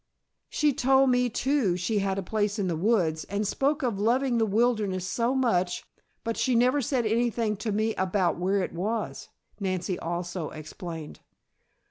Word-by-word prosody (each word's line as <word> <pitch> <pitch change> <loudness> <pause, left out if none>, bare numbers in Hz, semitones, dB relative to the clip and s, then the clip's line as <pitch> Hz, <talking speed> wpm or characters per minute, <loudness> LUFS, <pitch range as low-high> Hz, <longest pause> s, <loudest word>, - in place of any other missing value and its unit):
"She 300 -2 +2
told 265 +1 +4
me 250 0 +2
too 245 -7 +1
she 205 +4 0
had 195 -1 -1
a 195 - -2
place 210 +2 -1
in 200 -3 0
the 170 - 0
woods, 165 -4 +1
and 200 +1 -2
spoke 285 +6 0
of 230 -6 -1
loving 240 +3 +2
the 225 - +2
wilderness 210 -4 +1
so 235 +6 0
much, 185 -9 +1 0.4
but 230 0 -2
she 255 - +1
never 255 +4 +3
said 250 -1 0
anything 230 -1 +1
to 215 +1 -3
me 215 +2 +1
about 185 -2 0
where 190 +2 +1
it - - -5
was," 210 +6 -3 0.3
Nancy 185 -2 -2
also 175 -1 -3
explained. 155 +1 -8
210 Hz, 165 wpm, -27 LUFS, 185-240 Hz, 0.4 s, told